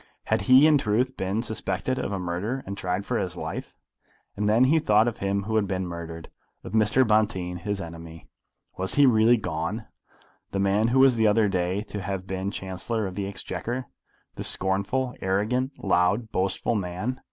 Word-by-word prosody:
Had - - 0
he 130 +3 +8
in 155 -2 +5
truth 125 +3 0
been 95 +4 -2
suspected 130 +3 -2
of 125 - -3
a 100 - -1
murder 95 +9 -3
and 100 - -5
tried 95 +1 -2
for - - -1
his 90 -2 -4
life? - - -6 0.6
And 105 +1 0
then 115 +4 +5
he 150 +5 +4
thought 110 -5 +3
of 120 - -3
him 100 0 -1
who 110 +2 -1
had 105 -2 +1
been 95 0 -2
murdered, 85 -1 -7 0.3
of - - -8
Mr. 110 +4 +3
Bonteen, 105 -5 +1
his 100 +2 -3
enemy. 80 -2 -9 0.5
Was 95 +1 0
he 145 - +6
really 115 -1 +5
gone, 90 +3 -3 0.7
the - - -1
man 100 +3 +2
who 130 +3 +6
the 115 -4 +3
other 105 0 +4
day 90 -2 0
was 105 +2 -3
to 105 -1 -6
have 95 -1 -4
been 95 0 -3
Chancellor 100 +3 -3
of 95 - -5
the 100 +1 -3
Exchequer, 120 +5 -4 0.5
the - - -6
scornful, 100 +7 +1
arrogant, 110 +8 0
loud, 100 +4 +1
boastful 95 +4 0
man? 105 +6 -3
100 Hz, 185 wpm, -26 LUFS, 95-115 Hz, 0.7 s, he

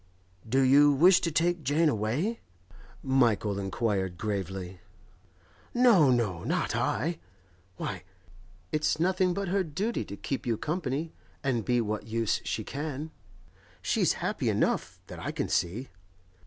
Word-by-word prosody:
'Do 135 +3 +3
you 140 +3 +6
wish 175 +6 +6
to 170 - -1
take 170 +2 +1
Jane 150 +5 +2
away?' 145 - 0 0.6
Michael 115 -7 +2
inquired 95 -2 -1
gravely. 95 -2 -4 1.0
'No, 230 - +6
no; 110 -9 +1
not - - -1
I! 165 +6 -1 0.6
Why, - - -4 0.7
it's 155 0 +1
nothing 185 +1 +2
but 200 -2 -2
her 195 +1 +1
duty 190 +9 -2
to 100 - -8
keep 135 -2 -4
you 115 -2 +1
company 155 - -3 0.3
and 125 -5 0
be 120 +1 +2
what 105 -1 -3
use 115 -1 0
she - - -3
can. 150 +1 -5 0.7
She's - - +2
happy - - 0
enough, - - 0
that - - -9
I - - -3
can - - -2
see. 100 +10 -1
135 Hz, 135 wpm, -28 LUFS, 110-165 Hz, 1.0 s, you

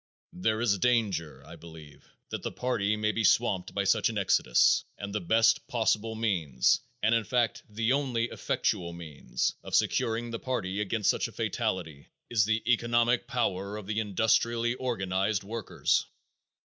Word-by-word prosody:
There 110 +4 0
is 100 -5 +2
danger, 90 - 0
I 80 +3 -11
believe, 80 -4 -14 0.2
that - - -4
the - - -4
party 110 -5 0
may 105 0 +1
be 115 - -2
swamped 100 -4 +2
by 100 - +1
such 105 +2 +2
an 110 - -4
exodus 90 -10 +3
and 100 -1 -6
the 105 - -1
best 115 +5 +3
possible 110 -1 0
means 85 - +1 0.2
and, 110 - +3
in 115 -1 +2
fact, 120 -2 0
the 110 +4 0
only 130 -5 0
effectual 85 -1 -1
means 80 -4 -3
of - - -3
securing 115 +1 +1
the 115 - -4
party 105 -6 -2
against 105 +1 +1
such - - -2
a - - -12
fatality 80 -6 -3 0.2
is 105 -4 +3
the 110 +1 0
economic 120 +1 +1
power 105 -6 -2
of 105 - -8
the 105 +2 -2
industrially 115 +3 +1
organized 100 -5 -1
workers. 110 +2 -1
110 Hz, 160 wpm, -29 LUFS, 95-115 Hz, 0.2 s, exodus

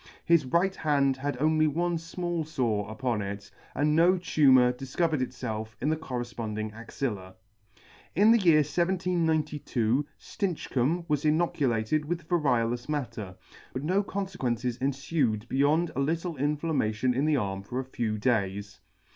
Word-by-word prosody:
His 165 -5 +4
right 180 +7 +2
hand 140 -3 +2
had 135 -1 -4
only 155 +1 +3
one 170 +3 0
fmall 170 0 -3
fore 115 -9 -1
upon 115 -1 -2
it, 100 0 -6 0.2
and 150 +1 +2
no 175 +3 +5
tumour 130 -8 +4
difcovered 145 +5 -1
itfelf 110 -4 -4
in 145 - 0
the - - +2
correfponding 120 -7 -4
axilla. 110 -4 -5 0.8
In 205 +6 +6
the 235 - +6
year 165 -6 +5
1792 155 -7 0 0.2
StincBcomb 170 - -1
was 150 -1 0
inoculated 150 -4 +1
with 165 +1 -4
variolous 125 -7 +1
matter, 115 -10 -4 0.4
but 130 - -4
no 185 +6 +2
confequences 125 - -3
enfued 135 -5 0
beyond 150 +6 +2
a - - -2
little 165 +4 -1
inflammation 140 -5 0
in 135 +4 0
the 155 -2 +3
arm 95 -4 -2
for 125 +6 -5
a 130 - -3
few 115 -4 -2
days. 105 -2 -1
140 Hz, 140 wpm, -28 LUFS, 120-160 Hz, 0.8 s, In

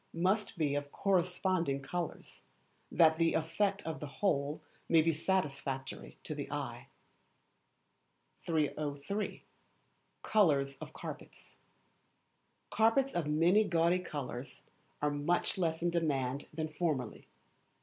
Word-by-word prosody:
must 190 +4 +1
be 150 -3 +1
of 145 0 -2
corresponding 180 -5 +1
colours, 170 +5 -5 0.5
that 160 -1 +5
the 165 0 +3
effect 195 +5 0
of 160 -1 -4
the 150 - -5
whole 145 -2 0 0.3
may 165 - +6
be 165 +1 +3
satisfactory 145 -6 -2
to - - -4
the - - -5
eye. - - -4 1.6
303. 155 +4 -1 0.8
Colours 145 -10 +3
of - - -8
Carpets. - - -9 1.1
Carpets 230 +5 +3
of 170 -4 -1
many 170 +8 +4
gaudy 170 -1 +2
colours 140 -6 -6 0.4
are 150 - +3
much 160 +6 0
less 165 -2 0
in 175 - +2
demand 140 -5 0
than 155 0 -3
formerly. 150 -6 -2
160 Hz, 110 wpm, -33 LUFS, 145-180 Hz, 1.6 s, may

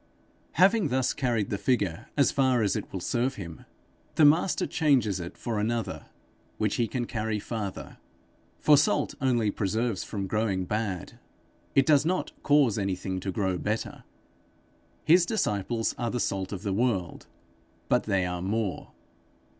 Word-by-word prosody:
Having 195 +1 +4
thus 130 -1 +1
carried 120 -7 -1
the 100 - -1
figure 100 -6 0
as 140 - +4
far 130 -4 +2
as 100 - +1
it - - -5
will 95 - -4
serve 120 +8 -1
him, 85 -5 -9 0.5
the 155 - +6
Master 160 +5 +3
changes 125 - +2
it 85 0 -7
for 115 -3 -3
another, 115 +2 -2 0.5
which 105 -2 0
he 120 - +1
can 125 0 -2
carry 110 -2 -2
farther. 105 -2 -6 0.6
For 150 -1 +5
salt 145 - +2
only 120 -5 +2
preserves 110 +1 -1
from 100 -3 -4
growing 100 -2 -1
bad; 105 -3 -3 0.6
it 135 - +5
does 150 -2 +5
not 180 +3 -1
cause 140 -8 +3
anything 95 -1 -2
to 95 +1 -3
grow 95 -2 -1
better. 110 +2 -3 1.0
His 175 +2 +6
disciples 115 - -1
are 120 -2 -1
the 125 - -2
salt 95 -4 -2
of 100 -1 -5
the 100 -3 -1
world, 100 -5 -1 0.6
but - - +2
they 95 -2 +1
are 90 -1 -3
more. 100 +1 -2
110 Hz, 155 wpm, -27 LUFS, 95-130 Hz, 1.0 s, the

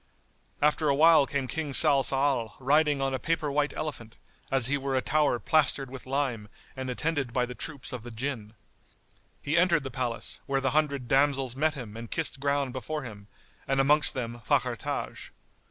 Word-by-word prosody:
After 150 0 +2
a 140 - +3
while 155 -1 +6
came 140 -2 -2
King 150 +2 -4
Salsal, 135 -5 +3
riding 145 +1 +2
on 135 0 -1
a 130 - -2
paper 165 -3 -1
white 145 +1 +1
elephant, 120 -7 -6 0.3
as 135 -3 +2
he 135 +4 +1
were 135 -1 -2
a 130 - +2
tower 150 -5 +2
plastered 140 -1 +2
with 130 -1 -10
lime 130 -6 -2 0.3
and 130 -1 -5
attended 145 0 -2
by 125 -1 +1
the 125 - -8
troops 140 0 -5
of 125 - -5
the 120 - -9
Jinn. 115 -2 -5 0.9
He 150 - -1
entered 170 -3 +3
the 135 - -6
palace, 120 -2 -2
where 135 0 +1
the 135 -1 0
hundred 140 -4 0
damsels 135 -1 +2
met 155 +3 +1
him 115 -6 -8
and 115 0 -8
kissed 160 -4 -2
ground 140 -2 -1
before 150 +4 -4
him, 105 -4 -10 0.4
and 135 0 +1
amongst 145 +2 +4
them 120 -2 -5
Fakhr - - +1
Taj. - - -5
135 Hz, 185 wpm, -28 LUFS, 125-150 Hz, 0.9 s, while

